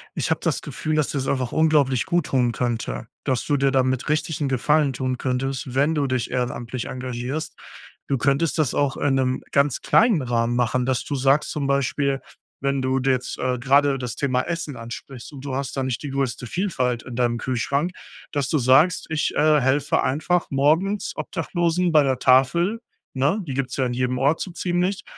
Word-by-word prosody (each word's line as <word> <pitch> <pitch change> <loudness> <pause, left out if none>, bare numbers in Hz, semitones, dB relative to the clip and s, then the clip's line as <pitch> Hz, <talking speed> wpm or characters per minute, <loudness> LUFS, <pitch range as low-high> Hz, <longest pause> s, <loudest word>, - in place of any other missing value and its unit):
ich - - -1
habe - - 0
das - - 0
Gefühl, 155 0 -3
dass 150 -2 +1
dir's 135 -2 -2
einfach 130 -3 -1
unglaublich 150 -6 +3
gut 175 -3 +1
tun 125 -3 +2
könnte, 115 - -3 0.2
dass 130 -2 0
du 145 - +1
dir 135 0 +2
damit 130 -1 +1
richtig 155 0 -1
'n 140 - 0
Gefallen 145 +2 +2
tun 130 0 -2
könntest, 130 0 -2
wenn 145 +4 +3
du 145 -2 +1
dich 130 -3 -2
ehrenamtlich 125 -1 -3
engagierst. 125 +4 -4 0.5
Du 135 - +1
könntest 140 +6 +1
das 155 - +1
auch 140 -2 0
in 140 -2 +1
'nem 130 -1 0
ganz 140 -1 +2
kleinen 225 -9 +4
Rahmen 120 -1 0
machen, 125 +1 +1
dass 130 0 0
du - - -4
sagst 135 +2 +2
zum 145 -2 -2
Beispiel, 140 0 0 0.4
wenn 140 0 0
du 130 0 +1
d 135 +1 +2
jetzt, 125 -1 -2
äh, 125 0 0
gerade 135 +2 +3
das 125 -2 -5
Thema 130 -3 +1
Essen 165 -2 -4
ansprichst 120 +2 -9
und 140 -2 -10
du 135 -2 -3
hast 135 0 -4
da 135 - 0
nicht 130 +1 -3
die 145 - -4
größte 130 -2 -2
Vielfalt 125 - -1
in 125 - -8
deinem 120 -1 +1
Kühlschrank, 140 +7 -1 0.4
dass 140 -3 -1
du 155 - +2
sagst: 135 +7 +4
„Ich, 160 -1 0
äh, 150 -1 +4
helfe 135 +3 +1
einfach 160 +7 0
morgens 160 +9 +1
Obdachlosen 175 0 -1
bei 150 -2 +6
der 130 -2 0
Tafel“, 170 - +3 0.3
ne? 140 +11 +1
Die 135 - -3
gibt's 130 -1 -3
ja 130 - +1
in 125 - -2
jedem 125 0 -1
Ort 140 +5 +2
so 185 - -4
ziemlich, 180 +2 -1
135 Hz, 195 wpm, -23 LUFS, 125-150 Hz, 0.5 s, bei